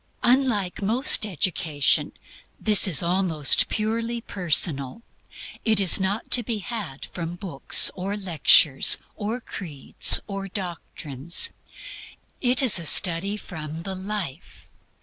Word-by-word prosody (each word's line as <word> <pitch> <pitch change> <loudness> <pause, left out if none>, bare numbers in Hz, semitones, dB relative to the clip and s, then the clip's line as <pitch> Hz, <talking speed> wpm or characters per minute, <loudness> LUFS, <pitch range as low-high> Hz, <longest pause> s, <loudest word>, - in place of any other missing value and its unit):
Unlike 240 -8 -1
most 220 +2 +2
education, 160 -5 -1 0.5
this 210 -2 +5
is 165 -6 +3
almost 170 -5 +1
purely 230 +2 -4
personal; 165 - -1 0.6
it 220 -3 +1
is 195 -1 +4
not 195 +4 -4
to 245 - +6
be 230 -1 -5
had 200 - -8
from 170 -1 -8
books, 175 -7 +3
or 195 +3 -6
lectures 160 -6 +3 0.2
or 220 +3 -6
creeds 160 - +1
or 195 -1 -8
doctrines. 170 - -4 0.9
It 250 +1 +1
is 235 -8 +4
a 165 - -8
study 190 +5 +1
from 160 -4 -10
the 190 +1 -7
life. 185 -5 -7
190 Hz, 115 wpm, -22 LUFS, 165-215 Hz, 0.9 s, to